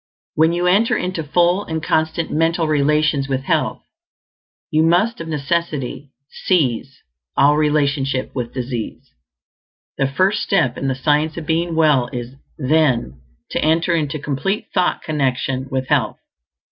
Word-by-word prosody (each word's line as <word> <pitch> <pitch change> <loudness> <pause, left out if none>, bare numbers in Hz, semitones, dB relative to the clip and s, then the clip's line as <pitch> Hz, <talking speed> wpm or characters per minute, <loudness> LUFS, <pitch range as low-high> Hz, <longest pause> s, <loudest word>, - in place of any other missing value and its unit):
When 160 +2 +3
you 175 +1 -1
enter 200 +6 +3
into 180 -2 -3
full 175 +5 +2
and 160 -3 -4
constant 160 +1 0
mental 165 +1 +1
relations 150 -1 +1
with 135 -1 -1
health, - - -1 0.9
you 155 - +3
must 175 +7 +2
of 165 - -6
necessity 150 -3 -2 0.2
cease 135 - -1 0.3
all 145 +1 +5
relationship 145 -3 0
with 120 -3 -4
disease. 125 -3 -5 0.9
The 135 - +2
first 190 +10 +1
step 130 -11 +1
in 135 - -3
the 130 - 0
Science 150 +4 +1
of 165 - -5
Being 165 +1 0
Well 150 -6 +3
is, 120 -1 -6 0.2
then, 130 - +1 0.3
to - - -1
enter 165 +3 +2
into 155 -2 -1
complete 150 +8 -3
thought 180 -1 +1
connection 135 -3 -1
with 130 -1 -2
health. 130 -8 +1
150 Hz, 140 wpm, -19 LUFS, 135-165 Hz, 0.9 s, all